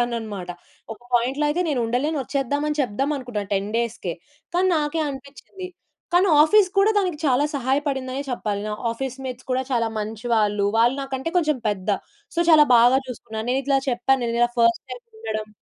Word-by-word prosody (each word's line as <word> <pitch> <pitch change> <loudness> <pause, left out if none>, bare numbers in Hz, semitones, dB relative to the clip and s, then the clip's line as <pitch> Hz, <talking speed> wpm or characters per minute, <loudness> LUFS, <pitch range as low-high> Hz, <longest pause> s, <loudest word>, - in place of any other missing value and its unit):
చేసేదాన్నన్నమాట. 220 -6 -3 0.4
ఒక 220 - -13
పాయింట్‌లో 260 +5 +1
అయితే 330 +4 0
నేనుండలేను, 255 +3 0
వచ్చేద్దామని 285 +3 -1
అని 300 - -3
చెప్దాం 265 +5 -1
అనుకున్నాను 215 -6 -5
10 195 +1 -1
డేస్‌కే. 230 -7 -2 0.4
కానీ 370 +1 +3
నాకే 300 +2 -1
అనిపించింది. 280 +7 -9 0.4
కానీ 365 +2 +4
ఆఫీస్ 385 +4 +5
కూడా 410 +2 +5
దానికి 360 -6 -1
చాలా 265 +2 +3
సహాయపడిందనే 270 0 -1
చెప్పాలి. 210 -4 -2
నా 210 - -2 0.2
ఆఫీస్ 260 +2 -4
మేట్స్ 255 -1 -7
కూడా 255 +1 +1
చాలా 230 -2 +1
మంచివాళ్ళు. 215 -1 0
వాళ్ళు 240 +4 +4
నాకంటే 270 +3 -4
కొంచెం 305 -4 +1
పెద్ద. 190 -2 -3 0.5
సో 340 - +2
చాలా 305 -2 +7
బాగా 245 +3 +6
చూసుకున్నారు. 225 -2 -6
నేనిట్లా 270 +1 +1
చెప్పాను. 250 +2 +1
నేనిలా 235 +1 +1
ఫస్ట్ 230 0 +3
టైమ్ 485 - -8 0.2
ఉండడం. 215 -1 -4
255 Hz, 155 wpm, -23 LUFS, 230-290 Hz, 0.5 s, చాలా